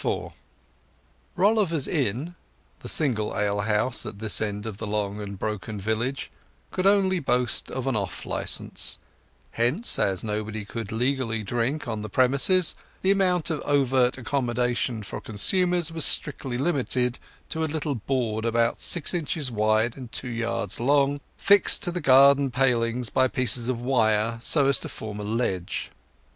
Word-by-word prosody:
IV -, -, -3 dB, 1.0 s
Rolliver's 190 Hz, -6 st, +1 dB
inn, 140 Hz, -, -2 dB, 0.5 s
the -, -, -6 dB
single 120 Hz, -9 st, +2 dB
alehouse 105 Hz, +4 st, 0 dB
at -, -, -8 dB
this 110 Hz, 0 st, +1 dB
end 105 Hz, -1 st, -3 dB
of 110 Hz, -3 st, -6 dB
the 110 Hz, -, -5 dB
long 105 Hz, 0 st, -3 dB
and 100 Hz, -1 st, -7 dB
broken 105 Hz, +1 st, -5 dB
village, 110 Hz, +6 st, -3 dB, 0.4 s
could 185 Hz, +1 st, 0 dB
only 195 Hz, -2 st, +3 dB
boast 125 Hz, -5 st, 0 dB
of 130 Hz, -, -5 dB
an 135 Hz, -3 st, -1 dB
off 100 Hz, -3 st, -4 dB
licence; -, -, +1 dB, 0.5 s
hence, 130 Hz, -, 0 dB
as 95 Hz, -2 st, 0 dB
nobody 110 Hz, 0 st, -4 dB
could 115 Hz, -1 st, -6 dB
legally 115 Hz, -1 st, -1 dB
drink 120 Hz, +8 st, -2 dB
on 110 Hz, -2 st, -3 dB
the 105 Hz, -, -6 dB
premises, 140 Hz, -, +3 dB, 0.3 s
the 190 Hz, -, +3 dB
amount 180 Hz, -4 st, +1 dB
of 155 Hz, -, -3 dB
overt 130 Hz, -3 st, +2 dB
accommodation 120 Hz, -2 st, -1 dB
for -, -, -7 dB
consumers 175 Hz, -, +2 dB
was 165 Hz, -1 st, 0 dB
strictly 130 Hz, -4 st, +2 dB
limited 130 Hz, -4 st, -1 dB, 0.3 s
to 160 Hz, -, -2 dB
a 160 Hz, -, -1 dB
little 150 Hz, -1 st, -2 dB
board 115 Hz, -2 st, -2 dB
about 115 Hz, 0 st, 0 dB
six 170 Hz, -1 st, +3 dB
inches 155 Hz, -5 st, -1 dB
wide 110 Hz, +1 st, +1 dB
and 125 Hz, -4 st, -10 dB
two 125 Hz, -, -2 dB
yards 115 Hz, 0 st, -2 dB
long, 140 Hz, +2 st, +2 dB, 0.2 s
fixed 200 Hz, -2 st, +4 dB
to 175 Hz, -, +1 dB
the 175 Hz, 0 st, -4 dB
garden 140 Hz, 0 st, +5 dB
palings 125 Hz, -2 st, 0 dB
by 130 Hz, 0 st, +3 dB
pieces 125 Hz, -2 st, +2 dB
of 120 Hz, -2 st, -2 dB
wire, 115 Hz, -3 st, +1 dB
so 140 Hz, +4 st, +4 dB
as 135 Hz, -3 st, +3 dB
to -, -, -6 dB
form 105 Hz, -1 st, -7 dB
a -, -, -5 dB
ledge. 105 Hz, -5 st, -2 dB
125 Hz, 155 wpm, -25 LUFS, 110-145 Hz, 1.0 s, garden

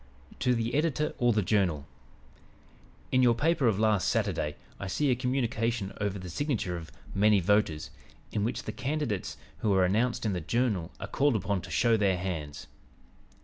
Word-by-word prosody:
"TO 125 Hz, -1 st, +2 dB
THE 115 Hz, 0 st, -1 dB
EDITOR 150 Hz, 0 st, +1 dB
OR 120 Hz, -2 st, +4 dB
THE 105 Hz, -2 st, +1 dB
JOURNAL: 90 Hz, -7 st, +1 dB, 1.3 s
"In 130 Hz, -, +4 dB
your 120 Hz, -2 st, +5 dB
paper 155 Hz, +1 st, +2 dB
of 110 Hz, -4 st, +2 dB
last 110 Hz, -4 st, +2 dB
Saturday 75 Hz, 0 st, 0 dB, 0.2 s
I 95 Hz, -, -4 dB
see 140 Hz, +9 st, +1 dB
a -, -, +3 dB
communication 120 Hz, -4 st, -1 dB
over 100 Hz, -1 st, -1 dB
the 90 Hz, -1 st, -7 dB
signature 105 Hz, -, -2 dB
of 80 Hz, -5 st, -8 dB, 0.2 s
'Many 105 Hz, +1 st, +4 dB
Voters' 90 Hz, -4 st, +1 dB, 0.4 s
in 105 Hz, -, -1 dB
which 115 Hz, -, -2 dB
the -, -, -4 dB
candidates 130 Hz, -4 st, -3 dB, 0.2 s
who 105 Hz, -, +1 dB
are 95 Hz, -1 st, +4 dB
announced 115 Hz, +6 st, +1 dB
in 105 Hz, -, +1 dB
the 90 Hz, -, -2 dB
Journal 105 Hz, -2 st, 0 dB
are -, -, -4 dB
called 135 Hz, +5 st, +1 dB
upon 100 Hz, -2 st, -1 dB
to -, -, -10 dB
'show 115 Hz, -2 st, +3 dB
their 100 Hz, -3 st, +2 dB
hands.' 80 Hz, -6 st, -4 dB
105 Hz, 175 wpm, -29 LUFS, 95-125 Hz, 1.3 s, your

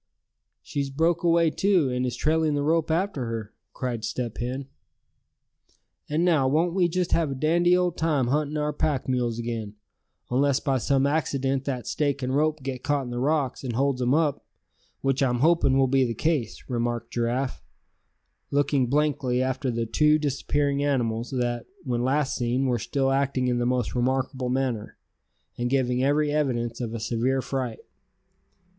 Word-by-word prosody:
"She's 140 Hz, -1 st, -3 dB
broke 165 Hz, +5 st, +1 dB
away 170 Hz, -1 st, +3 dB
too, 180 Hz, -7 st, +2 dB
and 125 Hz, 0 st, 0 dB
is 125 Hz, -, -3 dB
trailing 155 Hz, -1 st, +1 dB
the 145 Hz, -, 0 dB
rope 160 Hz, +1 st, +1 dB
after 160 Hz, -5 st, 0 dB
her!" 115 Hz, -2 st, -5 dB, 0.2 s
cried 120 Hz, -4 st, -4 dB
Step 115 Hz, 0 st, -3 dB
Hen. 130 Hz, +3 st, -3 dB, 1.4 s
"And 155 Hz, +4 st, +1 dB
now, 155 Hz, -7 st, +3 dB
won't 165 Hz, +5 st, +2 dB
we 180 Hz, -2 st, +3 dB
just 180 Hz, +1 st, -1 dB
have 165 Hz, -3 st, +2 dB
a 135 Hz, -, -3 dB
dandy 175 Hz, +5 st, +3 dB
old 180 Hz, -1 st, 0 dB
time 150 Hz, -6 st, +1 dB
hunting 150 Hz, +2 st, 0 dB
our 150 Hz, 0 st, -1 dB
pack 145 Hz, -2 st, -1 dB
mules 120 Hz, -3 st, 0 dB
again; 115 Hz, -3 st, -4 dB, 0.6 s
unless 140 Hz, +2 st, +2 dB
by 135 Hz, -3 st, 0 dB
some 135 Hz, +4 st, +2 dB
accident 135 Hz, -2 st, 0 dB
that 130 Hz, -4 st, -3 dB
stake 140 Hz, -2 st, -1 dB
and 130 Hz, +1 st, -1 dB
rope 155 Hz, -1 st, +1 dB
get 130 Hz, -1 st, -4 dB
caught 145 Hz, 0 st, 0 dB
in 125 Hz, -, -7 dB
the 120 Hz, -, -3 dB
rocks, 140 Hz, -1 st, 0 dB
and 125 Hz, -3 st, -3 dB
holds 135 Hz, +1 st, 0 dB
'em 125 Hz, +3 st, +3 dB
up; 155 Hz, -3 st, +1 dB, 0.6 s
which 135 Hz, 0 st, 0 dB
I'm 125 Hz, -2 st, +2 dB
hoping 160 Hz, -4 st, +4 dB
will 135 Hz, -, +4 dB
be 135 Hz, 0 st, +3 dB
the 115 Hz, -2 st, -1 dB
case," 150 Hz, -9 st, -1 dB
remarked 120 Hz, -1 st, -2 dB
Giraffe, 120 Hz, +3 st, -1 dB, 0.9 s
looking 140 Hz, -2 st, +2 dB
blankly 140 Hz, -2 st, +1 dB
after 130 Hz, +1 st, -1 dB
the 115 Hz, -1 st, -1 dB
two 150 Hz, +6 st, +3 dB
disappearing 145 Hz, -1 st, 0 dB
animals, 120 Hz, -5 st, 0 dB
that, 120 Hz, -2 st, -2 dB, 0.2 s
when 120 Hz, -5 st, -1 dB
last 135 Hz, +2 st, +1 dB
seen, 125 Hz, +2 st, 0 dB
were 125 Hz, -2 st, +1 dB
still 135 Hz, +4 st, 0 dB
acting 135 Hz, -1 st, +1 dB
in 125 Hz, -1 st, +1 dB
the 120 Hz, -, +1 dB
most 125 Hz, -2 st, 0 dB
remarkable 130 Hz, +1 st, -1 dB
manner, 125 Hz, -4 st, -2 dB, 0.6 s
and 120 Hz, 0 st, 0 dB
giving 125 Hz, -1 st, +1 dB
every 145 Hz, +2 st, +2 dB
evidence 125 Hz, -5 st, -1 dB
of 115 Hz, -1 st, -3 dB
a -, -, -3 dB
severe 120 Hz, +4 st, 0 dB
fright. 130 Hz, -4 st, -3 dB
135 Hz, 170 wpm, -26 LUFS, 125-150 Hz, 1.4 s, hoping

